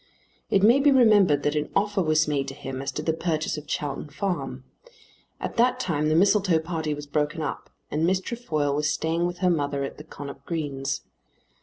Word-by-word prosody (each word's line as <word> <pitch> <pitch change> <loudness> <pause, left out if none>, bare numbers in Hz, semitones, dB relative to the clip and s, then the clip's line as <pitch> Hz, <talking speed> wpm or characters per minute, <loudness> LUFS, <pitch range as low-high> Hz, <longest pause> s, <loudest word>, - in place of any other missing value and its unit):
It 195 - +3
may 235 +6 +6
be 290 +1 +5
remembered 205 - +5
that 145 - +1
an 150 -1 -1
offer 205 -1 +1
was 155 -2 +2
made 140 -2 0
to 135 - -6
him 130 0 -6
as 135 0 -3
to 150 - -4
the 160 - +1
purchase 160 -1 -1
of 150 -1 -8
Chowton 145 -2 -3
Farm. 140 -6 -3 0.8
At - - -5
that 250 +2 +3
time 155 -8 0
the 155 - +2
Mistletoe 195 -1 +4
party 160 -2 -2
was 145 0 -7
broken 150 +2 -1
up, 150 - -5 0.2
and 155 +2 0
Miss 185 +1 +2
Trefoil 155 -10 -2
was 150 +1 +1
staying 165 +3 0
with 175 0 -5
her 180 - +5
mother 145 -3 -1
at 135 - -6
the - - -8
Connop 140 -3 -9
Greens. 140 -4 -3
155 Hz, 200 wpm, -25 LUFS, 145-185 Hz, 0.8 s, may